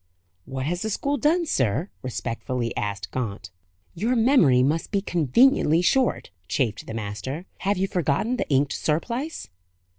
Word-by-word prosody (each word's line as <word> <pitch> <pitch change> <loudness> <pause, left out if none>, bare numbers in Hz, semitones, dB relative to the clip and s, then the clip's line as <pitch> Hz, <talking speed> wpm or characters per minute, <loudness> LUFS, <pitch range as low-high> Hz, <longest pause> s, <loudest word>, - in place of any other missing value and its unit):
"What 130 -1 -4
has 175 +4 -2
the 220 - -2
school 280 +7 -1
done, 325 +6 +2
sir?" 130 - 0
respectfully 120 -1 -3
asked 100 -1 -3
Gaunt. 100 -6 -4 0.4
"Your 225 +9 0
memory 220 - +5
must 155 +5 0
be 200 - +1
conveniently 175 - +3
short," 255 - +1 0.2
chafed 110 +3 -1
the 110 - -5
master. 115 - -5
"Have 200 +1 0
you 190 +1 +1
forgotten 180 - 0
the - - -3
inked 140 0 +2
surplice?" 235 - -2
155 Hz, 145 wpm, -24 LUFS, -, 0.4 s, memory